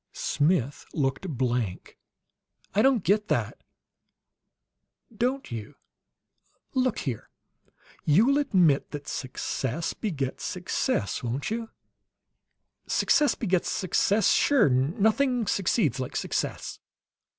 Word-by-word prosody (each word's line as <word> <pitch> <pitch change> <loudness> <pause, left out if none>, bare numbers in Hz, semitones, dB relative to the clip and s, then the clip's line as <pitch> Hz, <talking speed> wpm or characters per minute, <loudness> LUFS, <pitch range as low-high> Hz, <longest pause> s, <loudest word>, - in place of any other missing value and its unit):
Smith 145 -3 0
looked 140 +4 -1
blank. 120 - -2 0.7
"I 210 - +3
don't 255 -5 +3
get 210 +4 +2
that." - - -1 1.5
"Don't 255 - -1
you? 115 +4 -6 1.0
Look 255 -3 +1
here: 125 -7 -4 0.7
you'll 225 - +4
admit 180 - +3
that 145 -1 -6
success 130 +3 -3
begets 140 - -3
success, 100 - -1
won't 130 - -3
you?" 225 0 -3 1.2
"Success 295 -1 +3
begets 185 -7 0
success? 200 +2 +2
Sure! 270 - +4
'Nothing 220 - +2
succeeds 175 - +1
like 130 - -4
success.'" - - -3
175 Hz, 95 wpm, -27 LUFS, 135-225 Hz, 1.5 s, you'll